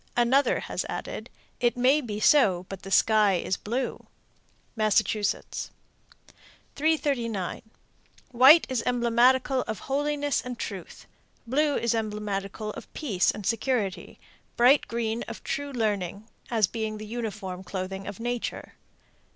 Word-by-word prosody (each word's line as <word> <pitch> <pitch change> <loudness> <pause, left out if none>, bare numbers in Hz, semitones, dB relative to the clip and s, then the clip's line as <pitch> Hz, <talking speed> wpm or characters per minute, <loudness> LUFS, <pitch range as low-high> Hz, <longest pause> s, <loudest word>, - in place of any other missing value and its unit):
Another 255 +4 +3
has - - -3
added, - - -5 0.3
It 240 0 +1
may 265 +5 +4
be 210 -5 -5
so, 200 -8 +4
but 195 -1 -7
the 195 - -9
sky 210 0 +4
is 180 +2 -1
blue. 245 +7 -4 0.7
Massachusetts. 215 -1 0 1.1
339. 275 - 0 0.7
White 265 +7 +8
is 255 -3 -1
emblematical 250 +2 +3
of 220 -4 -4
holiness 290 +1 0
and 245 -1 -6
truth. 195 -6 -7 0.4
Blue 290 +4 +1
is 235 -1 +1
emblematical 210 -1 -3
of - - -10
peace 210 - +1
and 210 - -3
security; 230 -3 -1 0.4
bright 255 +4 +5
green 230 +1 -2
of - - -8
true 285 0 -3
learning, 210 -4 -2 0.2
as 225 -3 +3
being 220 +1 -4
the 215 - -7
uniform 210 -5 -5
clothing 190 +1 -5
of 205 0 -7
nature. 240 0 -4
230 Hz, 125 wpm, -27 LUFS, 205-255 Hz, 1.1 s, White